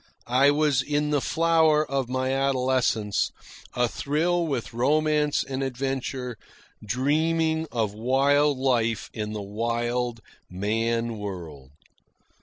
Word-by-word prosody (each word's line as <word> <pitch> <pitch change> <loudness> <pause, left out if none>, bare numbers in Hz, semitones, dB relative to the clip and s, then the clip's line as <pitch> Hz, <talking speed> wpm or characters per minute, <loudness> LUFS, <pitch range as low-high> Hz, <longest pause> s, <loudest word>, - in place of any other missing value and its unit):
I 130 +3 +4
was 145 -2 +2
in 150 +2 -1
the 145 -2 +2
flower 160 -1 +3
of 135 -3 -2
my 130 +1 -1
adolescence, 130 -6 +1 0.4
a 125 0 +2
thrill 165 +7 0
with 130 -7 -3
romance 150 +4 +2
and 135 0 -4
adventure, 130 -2 -3 0.5
dreaming 160 +7 +1
of 110 -4 -1
wild 140 +5 +2
life 120 -4 0
in 105 -1 -4
the 105 -1 -4
wild 120 +3 -2 0.3
man 115 +4 -1
world. 85 -10 -7
130 Hz, 110 wpm, -25 LUFS, 115-145 Hz, 0.5 s, I